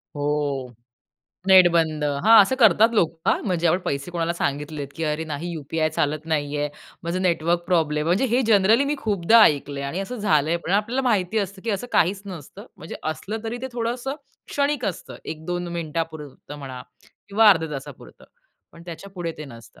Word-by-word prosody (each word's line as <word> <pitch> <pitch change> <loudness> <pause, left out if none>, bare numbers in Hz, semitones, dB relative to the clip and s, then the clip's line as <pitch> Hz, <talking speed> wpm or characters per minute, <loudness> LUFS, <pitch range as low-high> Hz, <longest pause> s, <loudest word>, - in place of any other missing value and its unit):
हो, 145 -3 -2 0.7
नेट 185 -2 +8
बंद. 160 -3 +1 0.2
हां, 225 +1 +8
असं 260 +7 -1
करतात 225 +1 +5
लोक 170 -7 +2 0.2
हां, - - +3
म्हणजे 175 -3 0
आपण 170 +3 +3
पैसे 140 +4 -3
कोणाला 170 -1 -1
सांगितलेत, 145 -2 -3
की 165 - -2
अरे 155 +1 -1
नाही 160 +2 -5
यूपीआय 155 0 -2
चालत 150 +2 -1
नाहीये, 145 -1 -1 0.3
माझं 170 +2 -2
नेटवर्क 170 -1 +1
प्रॉब्लेम, 155 -4 +1
म्हणजे 180 +9 +2
हे 250 - +4
जनरली 220 +5 +4
मी 290 - 0
खूपदा 215 0 +4
ऐकलंय 140 -3 0
आणि 140 +7 -3
असं 220 +6 -5
झालंय 160 -6 +2
पण. 170 - -7
आपल्याला 230 +6 +1
माहिती 205 -1 +1
असतं, 195 -1 -4
की 230 - -1
असं 200 +3 -2
काहीच 190 +4 +2
नसतं, 190 - -10
म्हणजे 160 - -8 0.2
असलं 215 +9 -6
तरी 230 +2 -4
ते - - -2
थोडंसं 245 +3 -3 0.3
क्षणिक 280 -3 0
असतं 190 - -5
1-2 175 +3 -4
मिनिटापुरतं 155 -3 -5
म्हणा 130 -3 -8 0.5
किंवा 215 +2 +5
अर्ध्या 160 -5 +1
तासापुरतं 135 -2 -9 0.5
पण 165 - -14
त्याच्यापुढे 175 0 -6
ते 155 - -6
नसतं. 115 -5 -14
170 Hz, 170 wpm, -23 LUFS, 150-205 Hz, 0.7 s, नेट